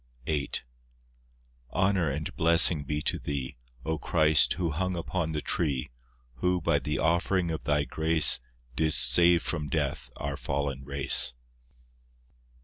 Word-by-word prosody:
VIII 75 Hz, -2 st, -3 dB, 1.2 s
Honour 95 Hz, -5 st, 0 dB
and 75 Hz, +2 st, -6 dB
blessing 80 Hz, -2 st, +5 dB
be 75 Hz, +2 st, -5 dB
to -, -, -1 dB
Thee, 70 Hz, -3 st, -6 dB, 0.3 s
O 80 Hz, -1 st, -3 dB
Christ, 80 Hz, -3 st, +2 dB
who 85 Hz, -3 st, -3 dB
hung 90 Hz, +4 st, -3 dB
upon 85 Hz, -1 st, -4 dB
the 75 Hz, -1 st, -5 dB
tree, 70 Hz, -5 st, -3 dB, 0.5 s
Who, 90 Hz, +5 st, -1 dB
by 80 Hz, -3 st, -1 dB
the 75 Hz, +1 st, -4 dB
offering 85 Hz, +1 st, -1 dB
of 80 Hz, -6 st, -7 dB
Thy 75 Hz, -1 st, 0 dB
grace, 80 Hz, 0 st, +6 dB, 0.4 s
Didst 75 Hz, -6 st, +3 dB
save 85 Hz, +4 st, +3 dB
from 75 Hz, -4 st, -5 dB
death 75 Hz, 0 st, -4 dB
our 70 Hz, 0 st, -6 dB
fallen 70 Hz, -1 st, -5 dB
race. 70 Hz, -3 st, +4 dB
75 Hz, 135 wpm, -26 LUFS, 70-85 Hz, 1.2 s, grace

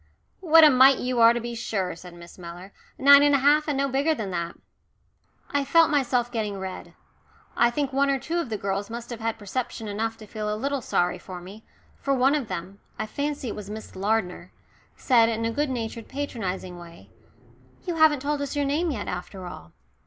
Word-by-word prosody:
"What 330 Hz, -3 st, +6 dB
a 305 Hz, -, +8 dB
mite 260 Hz, +1 st, +6 dB
you 250 Hz, -1 st, -2 dB
are, 230 Hz, 0 st, +8 dB
to 240 Hz, -, -1 dB
be 240 Hz, 0 st, -5 dB
sure," 195 Hz, -6 st, -3 dB
said 175 Hz, +1 st, -12 dB
Miss 170 Hz, +1 st, -14 dB
Mellor, 175 Hz, +3 st, -10 dB, 0.2 s
"nine 280 Hz, +1 st, +8 dB
and 290 Hz, 0 st, +4 dB
a -, -, +5 dB
half 295 Hz, +3 st, +3 dB
and 290 Hz, -3 st, -1 dB
no 275 Hz, 0 st, +1 dB
bigger 280 Hz, +4 st, +1 dB
than 210 Hz, -7 st, -4 dB
that." 170 Hz, -1 st, -3 dB, 1.0 s
I 285 Hz, -1 st, +1 dB
felt 330 Hz, +3 st, +4 dB
myself 250 Hz, -4 st, +1 dB
getting 215 Hz, -4 st, -3 dB
red. 190 Hz, -1 st, -7 dB, 0.6 s
I 235 Hz, -, +4 dB
think 275 Hz, +2 st, -2 dB
one 280 Hz, +1 st, +2 dB
or 275 Hz, -, +2 dB
two 330 Hz, +6 st, -3 dB
of 325 Hz, -8 st, -3 dB
the 215 Hz, -, -2 dB
girls 200 Hz, +1 st, -3 dB
must 235 Hz, +1 st, -7 dB
have 235 Hz, -, -6 dB
had 225 Hz, 0 st, -2 dB
perception 225 Hz, +2 st, -4 dB
enough 225 Hz, +2 st, -3 dB
to 215 Hz, -, -12 dB
feel 210 Hz, 0 st, -4 dB
a 210 Hz, -, -2 dB
little 280 Hz, +3 st, -2 dB
sorry 180 Hz, -4 st, 0 dB
for 180 Hz, 0 st, -9 dB
me, 195 Hz, +5 st, -12 dB, 0.3 s
for 275 Hz, -1 st, 0 dB
one 265 Hz, +2 st, +3 dB
of 290 Hz, -6 st, -1 dB
them 185 Hz, +3 st, -6 dB, 0.2 s
I -, -, -2 dB
fancy 285 Hz, +2 st, -3 dB
it -, -, -5 dB
was 205 Hz, -1 st, -8 dB
Miss 215 Hz, +1 st, -8 dB
Lardner 190 Hz, -3 st, -1 dB, 0.4 s
said 230 Hz, -3 st, +4 dB
in 225 Hz, 0 st, -2 dB
a 230 Hz, -, 0 dB
good 290 Hz, +4 st, -1 dB
natured 230 Hz, -2 st, -4 dB
patronising 190 Hz, -10 st, -5 dB
way, 170 Hz, -1 st, -14 dB, 0.7 s
"You 350 Hz, -3 st, -3 dB
haven't 305 Hz, -4 st, +4 dB
told 290 Hz, 0 st, -1 dB
us 285 Hz, +1 st, -4 dB
your 290 Hz, -1 st, 0 dB
name 305 Hz, +5 st, 0 dB
yet, 220 Hz, -9 st, -4 dB
after 180 Hz, +1 st, -6 dB
all." 80 Hz, -, -10 dB
230 Hz, 210 wpm, -25 LUFS, 200-280 Hz, 1.0 s, a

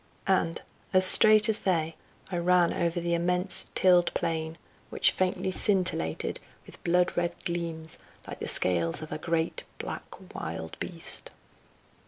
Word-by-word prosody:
And, 175 Hz, -3 st, 0 dB, 0.3 s
as 185 Hz, 0 st, +6 dB
straight 215 Hz, +3 st, +9 dB
as 220 Hz, -1 st, 0 dB
they, 165 Hz, -4 st, -1 dB, 0.4 s
I 175 Hz, -, -2 dB
ran 175 Hz, 0 st, +2 dB
over 170 Hz, 0 st, -2 dB
the 170 Hz, 0 st, -2 dB
immense 180 Hz, +2 st, -1 dB
tilled 180 Hz, -2 st, +3 dB
plain, 160 Hz, 0 st, -3 dB, 0.3 s
which -, -, +2 dB
faintly 185 Hz, 0 st, -2 dB
scintillated 185 Hz, -, -1 dB, 0.3 s
with -, -, -14 dB
blood 180 Hz, +1 st, +1 dB
red 175 Hz, 0 st, -2 dB
gleams 165 Hz, -3 st, -5 dB, 0.3 s
like -, -, -9 dB
the -, -, -5 dB
scales 85 Hz, -, +1 dB
of 155 Hz, -, -10 dB
a -, -, -5 dB
great 165 Hz, 0 st, -2 dB
black -, -, -9 dB
wild 80 Hz, 0 st, -7 dB
beast. -, -, -4 dB
170 Hz, 140 wpm, -27 LUFS, 160-185 Hz, 0.4 s, straight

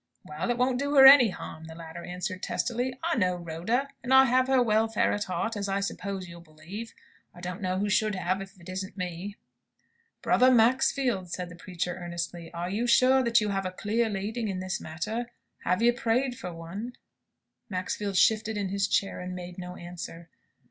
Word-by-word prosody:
"Well, 150 Hz, +9 st, -4 dB
it 240 Hz, -, +1 dB
won't 250 Hz, 0 st, +1 dB
do 285 Hz, +1 st, -1 dB
her 270 Hz, -1 st, +9 dB
any 265 Hz, -4 st, +10 dB
harm," 160 Hz, -3 st, -8 dB
the 160 Hz, 0 st, -10 dB
latter 165 Hz, 0 st, -9 dB
answered, 180 Hz, +1 st, -5 dB
testily. 250 Hz, +1 st, -2 dB
"I 340 Hz, +1 st, +1 dB
know 185 Hz, -6 st, +2 dB
Rhoda; 175 Hz, +11 st, -2 dB
and 255 Hz, -, -5 dB
I 265 Hz, 0 st, +8 dB
have 255 Hz, 0 st, +3 dB
her 265 Hz, -1 st, +4 dB
welfare 225 Hz, -2 st, +2 dB
at 205 Hz, 0 st, -2 dB
heart, 225 Hz, +5 st, -2 dB
as, 200 Hz, -1 st, -3 dB
I 195 Hz, 0 st, 0 dB
suppose, 200 Hz, -1 st, -4 dB
you'll 170 Hz, 0 st, -11 dB
believe. 170 Hz, +8 st, -9 dB, 0.4 s
I -, -, -12 dB
don't 180 Hz, +3 st, -6 dB
know 185 Hz, -1 st, -1 dB
who 205 Hz, +2 st, 0 dB
should 210 Hz, 0 st, +2 dB
have, 185 Hz, +1 st, -1 dB
if 195 Hz, 0 st, -11 dB
it 170 Hz, -, -15 dB
isn't 190 Hz, +2 st, -5 dB
me!" 180 Hz, +2 st, -5 dB, 0.9 s
"Brother 255 Hz, -, +5 dB
Maxfield," 245 Hz, -4 st, +3 dB
said 180 Hz, +1 st, -4 dB
the 175 Hz, -, -10 dB
preacher, 180 Hz, 0 st, -4 dB
earnestly, 170 Hz, -1 st, -5 dB
"are 170 Hz, 0 st, -4 dB
you 230 Hz, +5 st, -1 dB
sure 255 Hz, +2 st, +5 dB
that 235 Hz, -2 st, +3 dB
you 210 Hz, -, -1 dB
have 195 Hz, -1 st, -1 dB
a -, -, -4 dB
clear 220 Hz, +4 st, 0 dB
leading 215 Hz, +3 st, -3 dB
in 190 Hz, -2 st, -3 dB
this 185 Hz, 0 st, -3 dB
matter? 215 Hz, +10 st, -4 dB, 0.4 s
Have 180 Hz, +5 st, +1 dB
you 240 Hz, 0 st, +5 dB
prayed 245 Hz, +1 st, 0 dB
for 180 Hz, -8 st, -6 dB
one?" 180 Hz, +9 st, -7 dB, 0.8 s
Maxfield 195 Hz, +1 st, -2 dB
shifted 220 Hz, +1 st, +3 dB
in 200 Hz, -2 st, -2 dB
his 200 Hz, 0 st, 0 dB
chair, 195 Hz, -, 0 dB
and 180 Hz, 0 st, -5 dB
made 180 Hz, 0 st, -8 dB
no 180 Hz, 0 st, -7 dB
answer. 175 Hz, -1 st, -8 dB
195 Hz, 195 wpm, -28 LUFS, 180-235 Hz, 0.9 s, any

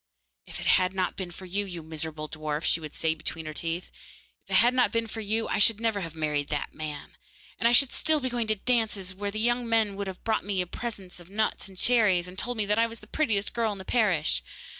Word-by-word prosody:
'If -, -, -7 dB
it -, -, -6 dB
had 185 Hz, +1 st, +3 dB
not 185 Hz, -1 st, 0 dB
been 190 Hz, -2 st, -5 dB
for 180 Hz, +2 st, -10 dB
you, 195 Hz, +3 st, -1 dB
you 175 Hz, -4 st, -7 dB
miserable 155 Hz, -1 st, -5 dB
dwarf!' 155 Hz, 0 st, -3 dB
she -, -, +2 dB
would 155 Hz, -2 st, -8 dB
say 160 Hz, -1 st, +1 dB
between 160 Hz, 0 st, -4 dB
her 155 Hz, -, -5 dB
teeth, 165 Hz, +3 st, -4 dB, 0.5 s
'if -, -, -30 dB
it -, -, +1 dB
had 240 Hz, +2 st, +6 dB
not 250 Hz, -1 st, +3 dB
been 230 Hz, 0 st, 0 dB
for 225 Hz, 0 st, -6 dB
you 220 Hz, +2 st, -1 dB
I -, -, 0 dB
should 210 Hz, +1 st, +5 dB
never 225 Hz, -3 st, 0 dB
have 165 Hz, -3 st, -6 dB
married 150 Hz, -2 st, -1 dB
that 145 Hz, -1 st, -2 dB
man, 150 Hz, -2 st, -7 dB, 0.4 s
and 230 Hz, -, +4 dB
I -, -, +4 dB
should 260 Hz, +2 st, +5 dB
still 315 Hz, -, +4 dB
have 290 Hz, -, -5 dB
been 255 Hz, -, -1 dB
going 240 Hz, -2 st, -1 dB
to 215 Hz, -, +2 dB
dances, 215 Hz, -4 st, 0 dB
where 200 Hz, +2 st, -3 dB
the 215 Hz, +2 st, -4 dB
young 240 Hz, +1 st, +1 dB
men 220 Hz, -3 st, +2 dB
would 200 Hz, 0 st, -4 dB
have 190 Hz, -1 st, -7 dB
brought 220 Hz, -1 st, +1 dB
me 190 Hz, -2 st, 0 dB
present 195 Hz, -2 st, -6 dB
of 175 Hz, 0 st, -14 dB
nuts 210 Hz, -1 st, -1 dB
and 190 Hz, -, -15 dB
cherries, 205 Hz, -6 st, +3 dB
and 180 Hz, -, -10 dB
told 245 Hz, +5 st, -2 dB
me 215 Hz, -, +2 dB
that 210 Hz, +2 st, +2 dB
I 230 Hz, -, +4 dB
was 230 Hz, -1 st, -8 dB
the -, -, -12 dB
prettiest 210 Hz, -5 st, 0 dB
girl 225 Hz, -1 st, +1 dB
in -, -, -8 dB
the 190 Hz, -, -9 dB
parish. 180 Hz, -, +2 dB
200 Hz, 260 wpm, -28 LUFS, 170-225 Hz, 0.5 s, had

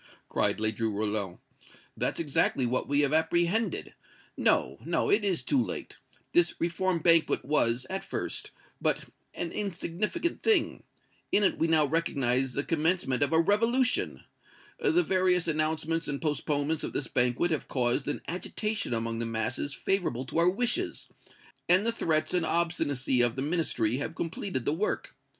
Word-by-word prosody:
cried -, -, +1 dB
Ledru 110 Hz, +1 st, 0 dB
Rollin. 105 Hz, -3 st, -2 dB, 0.6 s
"That's -, -, -2 dB
exactly 140 Hz, -4 st, +1 dB
what 125 Hz, +1 st, -1 dB
we 145 Hz, +1 st, +2 dB
have 145 Hz, 0 st, +1 dB
apprehended! 170 Hz, +6 st, +1 dB, 0.4 s
No 65 Hz, +2 st, +1 dB
no 165 Hz, +4 st, 0 dB
it 205 Hz, +1 st, +3 dB
is 190 Hz, -4 st, 0 dB
too 265 Hz, -3 st, +2 dB
late! -, -, -6 dB, 0.3 s
This 345 Hz, 0 st, +3 dB
Reform 175 Hz, +2 st, 0 dB
Banquet 165 Hz, -6 st, +4 dB
was, 125 Hz, -3 st, +1 dB
at 190 Hz, +1 st, -4 dB
first, -, -, -3 dB, 0.3 s
but -, -, 0 dB, 0.3 s
an 170 Hz, -, -3 dB
insignificant 205 Hz, -, -2 dB
thing. 445 Hz, -2 st, +2 dB, 0.5 s
In 205 Hz, -, +3 dB
it 190 Hz, -, +2 dB
we 165 Hz, -, +2 dB
now 160 Hz, -2 st, +4 dB
recognize 135 Hz, -5 st, 0 dB
the 140 Hz, -, -1 dB
commencement 160 Hz, -5 st, 0 dB
of 145 Hz, -, +2 dB
a 160 Hz, -, +4 dB
revolution. 230 Hz, +8 st, +2 dB, 0.6 s
The 365 Hz, -7 st, +3 dB
various 185 Hz, -, +2 dB
announcements 160 Hz, +1 st, 0 dB
and 140 Hz, -1 st, -3 dB
postponements 150 Hz, 0 st, -1 dB
of -, -, -4 dB
this 140 Hz, -, -1 dB
banquet 125 Hz, +9 st, +1 dB
have 155 Hz, -, -2 dB
caused 125 Hz, +1 st, 0 dB
an 145 Hz, -, -2 dB
agitation 205 Hz, -, -2 dB
among 115 Hz, 0 st, -2 dB
the 115 Hz, -, -2 dB
masses 115 Hz, +5 st, -2 dB
favorable 155 Hz, -7 st, -1 dB
to 135 Hz, -, -2 dB
our 170 Hz, +1 st, +5 dB
wishes, 245 Hz, -, -1 dB, 0.6 s
and 185 Hz, +4 st, +5 dB
the 230 Hz, -, +2 dB
threats 160 Hz, -9 st, 0 dB
and 180 Hz, -2 st, +2 dB
obstinacy 145 Hz, -7 st, +1 dB
of 120 Hz, -1 st, +2 dB
the 135 Hz, -, -2 dB
Ministry 140 Hz, -8 st, 0 dB
have 150 Hz, +4 st, -4 dB
completed 165 Hz, -, -3 dB
the 145 Hz, -, +1 dB
work. 195 Hz, +7 st, -2 dB
160 Hz, 155 wpm, -29 LUFS, 130-185 Hz, 0.6 s, our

